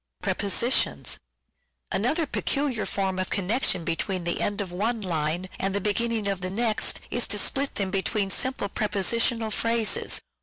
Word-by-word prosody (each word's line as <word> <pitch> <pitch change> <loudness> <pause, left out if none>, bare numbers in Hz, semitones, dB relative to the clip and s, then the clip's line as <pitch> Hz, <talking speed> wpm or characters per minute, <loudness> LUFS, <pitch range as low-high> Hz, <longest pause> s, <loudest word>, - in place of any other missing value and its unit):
Another 305 - +1
peculiar 275 -4 0
form 190 -1 -1
of 185 - -1
connection 200 -2 +1
between 175 +3 -1
the 170 - +1
Prepositions. - - +2
end 205 0 -2
of 190 -3 -4
one 220 +5 -1
line 170 -1 0
and 195 0 0
the - - +2
beginning 220 +2 +1
of 195 -2 -1
the 185 - -1
next 220 +2 0
is - - 0
to - - +2
split 275 +1 0
between 195 +1 0
them - - -1
simple 260 -6 0
Prepositional 220 +3 +1
phrases. 230 0 +1
205 Hz, 150 wpm, -26 LUFS, 190-230 Hz, -, Prepositions